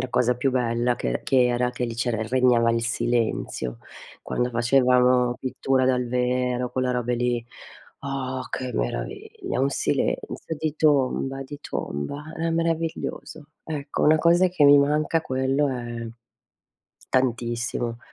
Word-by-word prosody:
la 130 - -3
cosa 125 0 +2
più 135 +2 +1
bella 120 -1 0
che 60 - -2
che 130 -2 +4
era 125 0 +1
che 125 0 -3
lì 115 - -4
c'era 115 -1 -1
regnava 120 0 +3
il 115 0 0
silenzio. 115 - -1 0.4
Quando 125 0 -1
facevamo 125 0 +3
pittura 130 0 0
dal 125 -1 +1
vero, 125 0 0
quella 130 -1 0
robe 125 0 -1
lì. 120 -1 -1 0.6
Oh, 130 -1 -3
che 130 -1 -3
meraviglia, - - -3
un 135 +1 +2
silenzio 160 - -2
di 155 -1 -2
tomba, 135 -2 +1
di 145 +2 -8
tomba. 70 - -4
Era 165 +1 -1
meraviglioso. 165 -2 -2 0.2
Ecco, 145 -2 -4
una 155 +1 +5
cosa 175 +3 +4
che 175 -4 -1
mi 145 0 +8
manca, 150 +3 +2
quello 135 +2 0
è 120 -2 -4 1.0
tantissimo. 120 -1 -1
125 Hz, 135 wpm, -24 LUFS, 120-140 Hz, 1.0 s, mi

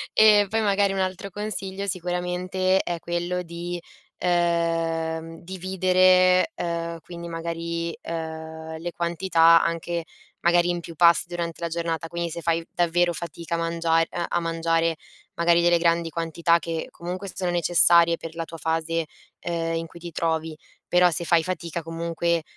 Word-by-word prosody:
Ehm, 210 -2 +6
poi, 225 0 +1
magari, 200 -1 +2
un 195 - -2
altro 185 +1 -2
consiglio 200 -1 -4
sicuramente 180 +1 0
è 175 -2 -3
quello 175 +1 -2
di, 170 +1 -6 0.4
uhm, 165 -2 0
dividere, 185 - +3
uhm, 170 -1 -3
quindi, 170 0 -9
magari, 170 0 -4
uhm, 160 -1 -6
le 175 +1 -4
quantità 170 -1 +4
anche 170 0 -2 0.4
magari 175 0 +3
in 175 - 0
più 170 -1 -10
pasti 170 +1 +5
durante 170 -1 -4
la 170 - -2
giornata; 165 0 -3
quindi 170 0 -3
se 170 +1 -6
fai, 165 0 0
davvero, 175 0 +2
fatica 170 0 -5
a - - -1
mangia 165 0 +1
ehm, 170 +1 -1
a - - +1
mangiare, 165 0 0 0.4
magari, 170 0 +3
delle 175 0 +4
grandi 170 0 +1
quantità 165 +1 +1
che 165 -1 -4
comunque 185 +3 -6
sono 180 -2 -2
necessarie 170 0 +5
per 165 -1 -9
la 165 -1 -3
tua 165 - -9
fase, 165 +1 -1 0.4
uhm, 165 -1 -2
in 165 0 -3
cui 170 - -13
ti 170 0 -8
trovi. 160 -1 -1 0.3
Però, 180 0 +5
se 170 +1 -3
fai 165 -1 +3
fatica 170 -1 -4
comunque, 165 0 -1
170 Hz, 155 wpm, -24 LUFS, 165-175 Hz, 0.4 s, Ehm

